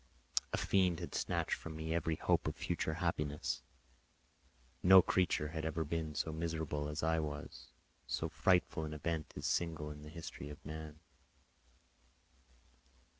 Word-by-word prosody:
A - - +1
fiend 90 -4 +3
had - - -6
snatched - - 0
from 80 -1 -4
me 80 +1 -2
every 80 -1 +1
hope - - +2
of - - -1
future 80 - -1
happiness; 75 -3 -1 1.2
no 95 0 +9
creature 85 -4 +2
had 80 0 -4
ever 80 0 0
been 80 0 -2
so 80 - 0
miserable 80 -2 -2
as 75 0 -3
I 80 0 +3
was; 75 -2 -5 0.4
so - - 0
frightful 90 -3 +2
an 75 0 -4
event 80 0 -2
is - - -5
single 80 -3 0
in 75 0 -9
the 75 - -9
history 80 -3 -7
of 75 - -7
man. 75 0 -6
80 Hz, 145 wpm, -36 LUFS, 75-85 Hz, 1.2 s, no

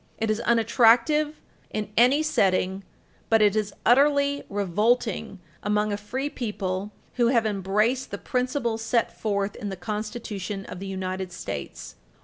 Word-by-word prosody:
It 225 -1 0
is 215 - -1
unattractive 235 +6 +3 0.3
in 210 -1 -4
any 260 +6 +5
setting, 190 -9 +1 0.5
but 225 - +5
it 210 -1 +4
is 210 -2 0
utterly 280 +3 +4
revolting 210 +2 0 0.2
among 210 0 0
a - - +1
free 250 +7 -3
people 205 -6 -3 0.3
who 240 -1 +4
have 235 -2 +3
embraced 210 +5 0
the - - -5
principles 250 -3 -1
set 230 0 0
forth 200 -2 -1
in 205 - -5
the 190 - -4
Constitution 210 0 -5
of - - -8
the 195 - -6
United 185 -1 -4
States. 180 - -7
215 Hz, 140 wpm, -25 LUFS, 200-245 Hz, 0.5 s, any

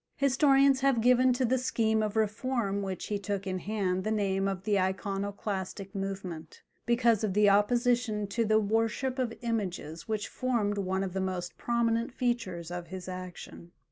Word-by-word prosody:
Historians 275 0 +4
have 270 -3 +3
given 250 +2 +5
to 250 +1 +1
the 255 +2 +2
scheme 220 -3 +1
of 215 0 -2
reform 215 -1 0
which 190 -2 -4
he 205 -1 -2
took 200 -1 -3
in 185 -1 -2
hand 190 -2 -1
the 215 - -1
name 195 -2 +1
of 190 -1 -3
the 205 -1 +2
Iconoclastic 195 0 -3
movement, 190 -5 -6 0.2
because 235 -2 +3
of 200 -3 -1
the 210 0 +5
opposition 235 +1 +2
to 230 +4 -1
the 215 0 +3
worship 225 +5 0
of 250 -3 0
images 185 -8 -3
which 215 -2 -2
formed 220 -5 -1
one 190 0 -1
of 185 -2 -4
the 190 - -1
most 185 -2 -3
prominent 235 0 0
features 215 -10 -2
of 175 -1 -5
his 185 -1 -7
action. 180 -1 -8
210 Hz, 170 wpm, -29 LUFS, 190-235 Hz, 0.2 s, given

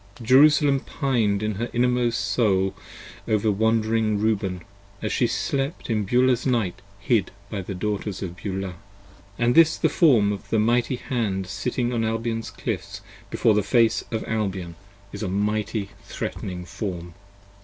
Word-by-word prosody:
45 115 -1 -11
Jerusalem 140 +1 +6
pined 115 -9 0
in 110 0 0
her 120 - -2
inmost 120 -1 +1
soul 95 -5 +1 0.5
over 110 0 +2
Wandering 110 0 +1
Reuben 100 -4 0 0.4
46 - - -13
As 105 - -1
she 120 - +2
slept 135 +5 -2
in 105 -2 0
Beulah's 125 +3 +3
Night 115 -10 0 0.2
hid 110 -1 +1 0.2
by 100 - -3
the 95 +1 -6
Daughters 105 +1 -3
of 90 -2 -5
Beulah. 95 0 -4
p. - - -8 0.6
70 120 - +1
AND 120 - +3
this 160 +1 +5
the 160 - +2
form 125 -11 +4
of 100 - -7
mighty 120 +3 +2
Hand 110 -7 -2
sitting 120 +5 -2
on 115 -1 0
Albion's 115 0 -2
cliffs - - -5 0.3
Before 110 - +2
the 105 - +3
face 115 +1 +2
of 110 -1 -3
Albion, 95 -6 -2 0.4
a 110 - -4
mighty 105 +1 -1 0.2
threat'ning 90 -2 -5
Form. 85 -2 -5
110 Hz, 155 wpm, -24 LUFS, 100-120 Hz, 0.6 s, Jerusalem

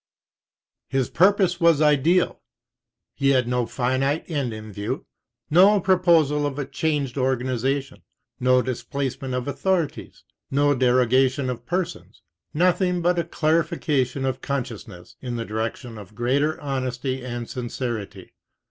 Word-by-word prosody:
His 135 -2 -1
purpose 185 0 +3
was 170 -4 +4
ideal. 155 +4 +3 0.7
He 140 0 +1
had 130 -3 +3
no 125 -1 0
finite 135 +4 0
end 140 -7 -2
in 110 -1 -8
view, 100 +1 -4 0.5
no 195 +6 +6
proposal 170 -6 +3
of 140 -1 -5
a 145 - -2
changed 145 -4 -2
organization, 130 +1 -1 0.4
no 125 0 +3
displacement 130 +1 -3
of 125 -1 -2
authori 170 +2 0
ties, - - -13 0.3
no 145 +1 +3
derogation 130 +1 +2
of 120 -1 -8
persons, 165 - -4 0.3
nothing 180 +1 +1
but 175 0 +2
a - - +1
clarification 155 -5 0
of 130 -1 -2
con 140 -2 -1
sciousness 100 -6 -12
in 125 -2 -4
the 115 -1 -3
direction 115 +1 -4
of 105 0 -13
greater 140 +6 0
honesty 130 -1 -3
and 120 -2 -5
sincerity. 120 -4 -5
135 Hz, 130 wpm, -23 LUFS, 125-155 Hz, 0.7 s, no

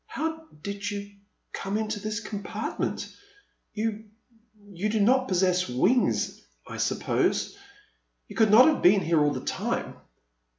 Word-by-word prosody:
How 320 0 -4 0.2
did 200 0 -4
you 200 0 -6 0.4
come 195 +2 -2
into 215 -1 -2
this 215 0 -3
compartment? 205 -2 -4 0.6
You 220 0 -3 0.3
— 220 -1 -32
you 195 +3 -2
do 220 0 0
not 255 +5 +3
possess 185 -1 +2
wings, 195 - +1 0.3
I - - -7
suppose. - - 0 0.7
You - - -11
could 220 -2 +4
not 225 +5 +8
have 310 -3 +2
been 195 +2 +6
here 165 -2 +2
all 145 - +2
the - - -5
time. - - -2
210 Hz, 140 wpm, -27 LUFS, 195-225 Hz, 0.7 s, not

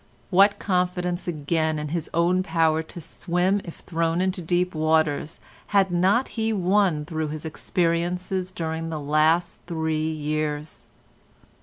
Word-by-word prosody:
What 200 +2 +5
confidence 180 -1 -1
again 155 0 0
in 150 0 -4
his 165 0 -3
own 175 +2 +2
power 160 -4 +2
to 160 +2 -9
swim 180 +4 0
if 170 - -10
thrown 165 0 -1
into 185 0 0
deep 175 +2 0
waters 155 -1 +1 0.3
had 195 -2 +3
not 190 +8 +2
he 225 -1 -1
won 185 -5 +2
through 160 -1 -2
his 155 +1 -6
experiences 180 +3 -1
during 165 -2 -3
the 160 -1 -3
last 155 +4 +2
three 160 -2 -1
years! 150 -4 -3
170 Hz, 135 wpm, -24 LUFS, 155-180 Hz, 0.3 s, What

